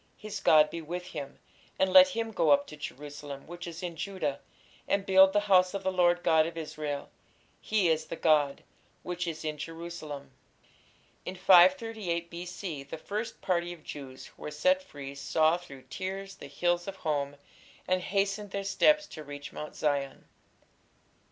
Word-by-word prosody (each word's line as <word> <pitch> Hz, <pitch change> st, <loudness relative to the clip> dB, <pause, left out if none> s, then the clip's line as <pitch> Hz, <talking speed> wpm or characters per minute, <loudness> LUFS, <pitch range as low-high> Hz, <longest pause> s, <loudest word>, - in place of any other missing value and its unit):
his 210 Hz, -1 st, -6 dB
God 155 Hz, -1 st, +5 dB
be 170 Hz, -, -5 dB
with 175 Hz, +3 st, -5 dB
him, 145 Hz, -6 st, -7 dB, 0.4 s
and 190 Hz, 0 st, +2 dB
let 280 Hz, 0 st, +10 dB
him 230 Hz, -4 st, -3 dB
go 165 Hz, -7 st, +1 dB
up 140 Hz, 0 st, +5 dB
to 150 Hz, -, -10 dB
Jerusalem, 145 Hz, -1 st, -8 dB
which 175 Hz, +2 st, -8 dB
is 170 Hz, +1 st, -7 dB
in 175 Hz, -2 st, -4 dB
Judah, 160 Hz, -4 st, -3 dB, 0.5 s
and 200 Hz, -1 st, +1 dB
build 190 Hz, 0 st, +7 dB
the 205 Hz, +1 st, +2 dB
house 185 Hz, -2 st, +4 dB
of 195 Hz, -, -4 dB
the 190 Hz, -, +1 dB
Lord 175 Hz, -1 st, +3 dB
God 160 Hz, 0 st, +4 dB
of 165 Hz, 0 st, -8 dB
Israel 150 Hz, -2 st, -5 dB, 0.5 s
(he 210 Hz, -4 st, +2 dB
is 160 Hz, -1 st, +1 dB
the -, -, -5 dB
God) 150 Hz, -4 st, +2 dB, 0.4 s
which 180 Hz, 0 st, -3 dB
is 160 Hz, -1 st, -5 dB
in 155 Hz, -1 st, -3 dB
Jerusalem. 165 Hz, -3 st, -7 dB, 0.9 s
In 185 Hz, -, -6 dB
538 185 Hz, -1 st, +4 dB
B.C. 175 Hz, -2 st, -6 dB
the 140 Hz, +2 st, -8 dB
first 210 Hz, +7 st, -5 dB
party 175 Hz, -2 st, 0 dB
of 165 Hz, -3 st, -15 dB
Jews 135 Hz, -3 st, -8 dB
who -, -, -17 dB
were -, -, -4 dB
set 275 Hz, -, +2 dB
free 140 Hz, -, -9 dB
saw 155 Hz, +4 st, +2 dB
through 135 Hz, -7 st, -12 dB
tears 190 Hz, +8 st, -5 dB
the 195 Hz, -, -11 dB
hills 175 Hz, +5 st, 0 dB
of 195 Hz, -, -5 dB
home, 145 Hz, -5 st, -2 dB, 0.5 s
and 185 Hz, 0 st, +2 dB
hastened 200 Hz, +2 st, -1 dB
their 200 Hz, +1 st, -3 dB
steps 300 Hz, +10 st, +4 dB
to 155 Hz, -, -8 dB
reach 145 Hz, 0 st, -8 dB
Mount 150 Hz, -, -7 dB
Zion. 140 Hz, -2 st, -1 dB
170 Hz, 170 wpm, -29 LUFS, 150-190 Hz, 0.9 s, let